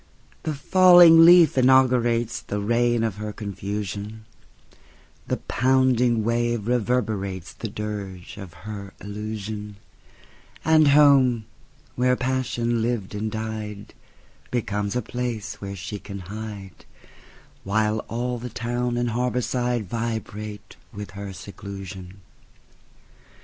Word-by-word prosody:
The 155 - -3
falling 175 +1 +7
leaf 175 -3 +7
inauguratesThe 120 -5 +2
reign 120 0 +2
of 110 -4 -2
her 105 0 -4
confusion; 105 +1 -5 1.0
The - - -1
pounding 125 -3 +2
wave 120 0 0
reverberatesThe 110 -4 -2
dirge 100 -4 -6
of 95 -4 -9
her 100 -2 -7
illusion; 105 0 -6 0.9
And 155 -1 +5
home, 140 -5 +5 0.5
where 125 +1 +2
passion 125 -2 -1
lived 115 -4 -2
and 105 +1 -3
died, 110 -2 -6 0.6
Becomes 105 -3 -2
a 125 - 0
place 120 -2 -4
where 100 -1 -5
she 100 +2 -6
can 100 0 -8
hide, 100 0 -8 0.8
While 105 +2 +1
all 120 +1 -3
the 125 +1 -6
town 120 +1 -2
and 120 -1 0
harbor 125 +1 0
sideVibrate 115 -3 -3
with 105 0 -8
her 100 -1 -7
seclusion. 95 0 -9
110 Hz, 100 wpm, -24 LUFS, 105-125 Hz, 1.0 s, falling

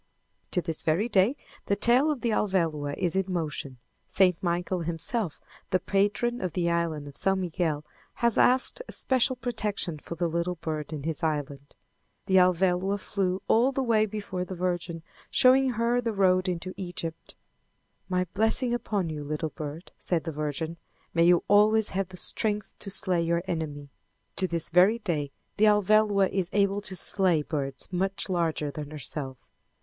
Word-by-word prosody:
To 180 - -1
this 160 0 -3
very 170 +8 +1
day 210 +3 +3 0.3
the 200 - +2
tail 245 +8 +4
of 290 -5 -2
the 235 - 0
Alvéloa 165 -9 0
is 175 0 -1
in 190 0 0
motion. 150 -6 -3 0.3
St. 185 -2 +3
Michael, 175 +1 -1
himself, 170 +3 -2 0.3
the 185 - +2
patron 205 +6 0
of 180 -3 -3
the 170 -2 0
island 165 -4 -1
of 145 - -10
S. - - -1
Miguel, 165 -4 -2 0.3
has 235 -2 +1
asked 260 - +3
a - - -8
special 260 0 +1
protection 210 - -2
for 170 - -8
the 170 +1 0
little 170 +2 -2
bird 155 -2 -5
in 150 -3 -5
his 160 0 -3
island. 145 -3 -3 0.5
The 190 -1 +3
Alvéloa 185 +2 +2
flew 190 -1 -2
all 240 +4 +4
the 270 0 -1
way 220 -3 +2
before 200 -3 -4
the 185 +1 -7
Virgin, 175 -2 -3 0.3
showing 260 0 +4
her 235 +2 +1
the 230 -2 -2
road 185 -1 +2
into 180 +1 -4
Egypt. 175 -3 -6 0.7
"My 180 0 +1
blessing 225 +4 +1
upon 205 -6 -1
you, 155 -2 -5
little 155 +2 -3
bird," 155 +4 -7
said 170 -4 0
the 165 - -4
Virgin. 155 +2 -4 0.4
"May 165 0 +3
you 175 0 +4
always 210 +1 +4
have 195 0 -2
the 185 0 -12
strength 210 +1 0
to 200 - -5
slay 185 -2 +4
your 170 +1 0
enemy." 150 -5 -4 0.5
To 190 - +1
this 170 -2 +1
very 185 +6 +5
day 155 -10 -2 0.3
the 215 - +4
Alvéloa 210 -1 +4
is 190 -2 -1
able 200 0 +2
to 195 -2 -3
slay 180 -4 +4
birds 140 -3 -4
much 190 +2 -1
larger 165 -5 -1
than 150 0 -7
herself. 140 -2 -4
180 Hz, 170 wpm, -27 LUFS, 160-205 Hz, 0.7 s, very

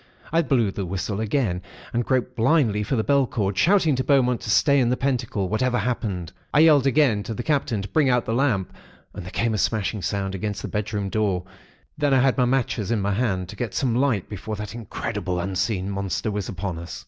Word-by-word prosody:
I 165 - +4
blew 125 -9 +1
the 100 - -4
whistle 95 +3 -3
again, 110 -6 0 0.3
and 120 +1 +1
groped 125 0 -1
blindly 115 -3 +2
for 110 +6 -1
the 110 - +1
bell 140 0 +3
cord, 100 -4 -1
shouting 170 - +3
to 130 - 0
Beaumont 125 -4 +2
to - - -6
stay 140 +6 +4
in 120 -2 +2
the 125 - +1
pentacle, 120 -7 -1
whatever 120 +5 0
happened. 105 -9 -2 0.2
I 150 - +7
yelled 150 -4 +6
again 135 -6 +3
to 110 +2 -5
the 120 - -4
Captain 130 -8 0
to - - -5
bring 135 +8 +2
out 125 -2 +1
a 115 - 0
lamp, 115 -7 0 0.4
and 100 - -7
there 90 - -8
came 115 +4 0
a 105 - -1
smashing 105 0 0
sound 95 +2 -2
against 105 +1 -4
the - - -3
bedroom 105 -1 -2
door. 100 -4 0 0.6
Then 145 -2 +3
I - - +5
had 135 -1 +3
my 125 - +3
matches 120 -5 0
in 115 -2 +1
my 100 0 0
hand, 95 -5 -1
to 105 - -8
get 115 -1 -4
some 130 -4 +1
light 125 -7 +1
before 105 +1 -5
that 105 +1 -6
incredible, 100 -5 -4
unseen 95 +1 -1
Monster 100 +2 -2
was 105 -2 -3
upon 95 -2 -4
us. 85 - -7
110 Hz, 220 wpm, -24 LUFS, 100-130 Hz, 0.6 s, I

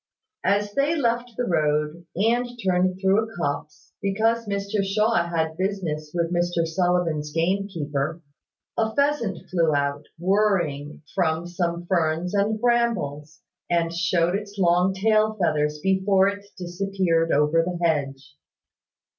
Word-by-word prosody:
As 205 +1 +1
they 285 +6 +1
left 240 -4 0
the 245 - 0
road, 150 -1 0
and 235 +6 +1 0.2
turned 185 0 +2
through 190 +2 +3
a 225 0 -9
copse, 150 -1 -4
because 220 +3 +1
Mr 200 0 -1
Shaw 205 -2 +1
had 160 -1 -1
business 180 -6 -2
with 170 0 -1
Mr 175 -1 +1
Sullivan's 165 -3 0
gamekeeper, 165 -4 -1 0.6
a 220 0 0
pheasant 280 - 0
flew 165 -4 +2
out, 140 +1 -1
whirring, 170 -6 0
from 165 -3 0
some 175 -1 -2
ferns 170 0 0
and 205 +2 +1
brambles, 220 -12 0 0.3
and 170 -1 +1
showed 175 0 +1
its 205 +1 -4
long 180 +1 +3
tail 215 +2 +2
feathers 150 -3 +1
before 190 0 +3
it 200 0 -7
disappeared 175 -2 0
over 150 +3 +3
the 175 +1 -3
hedge. 140 -3 -2
180 Hz, 130 wpm, -24 LUFS, 160-200 Hz, 0.6 s, through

